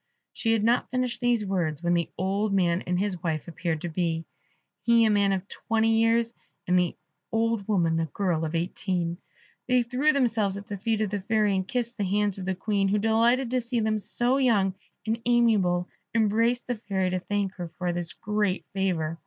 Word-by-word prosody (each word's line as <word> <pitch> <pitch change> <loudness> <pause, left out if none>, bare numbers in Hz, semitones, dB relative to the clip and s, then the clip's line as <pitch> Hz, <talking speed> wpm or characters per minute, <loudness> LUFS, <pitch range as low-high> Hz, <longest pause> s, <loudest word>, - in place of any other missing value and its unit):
She 225 -1 +1
had 220 -2 +1
not 235 +2 +2
finished 250 -1 -1
these 240 -3 +2
words, 170 -5 -1
when 175 0 +2
the 170 -1 0
old 195 +3 0
man 175 -1 +2
and 180 0 +1
his 190 -2 -1
wife 160 -4 -2
appeared 170 -2 -3
to - - -3
be, 165 -1 -1 0.6
he 235 -1 +4
a 215 - +3
man 200 -1 +3
of 190 0 -2
twenty 225 +1 +1
years, 230 +1 +2 0.3
and 180 0 +3
the 180 -2 0 0.4
old 225 -2 0
woman 170 -6 +2
a 165 - -1
girl 175 -3 -1
of 160 +1 -2
eighteen. 175 0 -2 0.5
They 250 -1 +3
threw 255 +6 +2
themselves 225 -8 +1
at 200 - -8
the 205 - -5
feet 220 +1 0
of 210 -3 -1
the 205 - -1
Fairy, 210 0 +1
and 190 0 -1
kissed 240 +1 -2
the - - +1
hands 205 0 0
of 185 - -5
the 190 0 -1
Queen, 200 +1 0
who, 200 +2 +2
delighted 230 +4 +2
to 255 -1 +1
see 235 0 -2
them 215 -1 +1
so 245 +5 0
young 215 -8 +3 0.3
and 225 +1 -1
amiable, 210 -7 +3 0.3
embraced 230 +2 +2
the 245 -2 -2
Fairy 195 -4 -1
to 185 - 0
thank 200 0 -2
her 175 -2 -4
for 180 -1 -1
this 170 -1 -3
great 210 -2 -1
favour. 170 -4 -1
205 Hz, 200 wpm, -26 LUFS, 180-230 Hz, 0.6 s, he